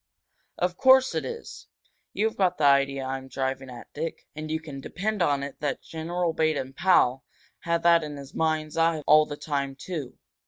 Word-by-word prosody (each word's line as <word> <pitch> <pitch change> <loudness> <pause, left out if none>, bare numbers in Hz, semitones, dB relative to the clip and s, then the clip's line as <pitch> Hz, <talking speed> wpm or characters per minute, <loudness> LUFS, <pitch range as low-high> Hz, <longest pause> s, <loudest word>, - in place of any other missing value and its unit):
"Of 180 0 -1
course 265 0 +6
it - - -1
is! 465 -1 -8 0.4
You've 220 +1 0
got 185 -5 +1
the 155 - -2
idea 140 -1 +3
I'm 135 0 -4
driving 135 0 -3
at, 120 -1 -11
Dick. 160 +2 -5
And 155 +1 -6
you 160 0 -1
can 145 -4 -9
depend 205 +7 -3
on 145 -4 +2
it 140 - -7
that 145 -2 -2
General 170 +1 -2
Baden 155 -5 0
Powell 135 -6 +3 0.4
had 170 0 -1
that 170 -1 +5
in 150 -1 -6
his 140 -1 -10
mind's 155 -1 -1
eye 165 -2 +2
all 155 0 +6
the 145 - -6
time, 140 -3 -3
too. 145 -3 -6
155 Hz, 185 wpm, -26 LUFS, 140-170 Hz, 0.4 s, course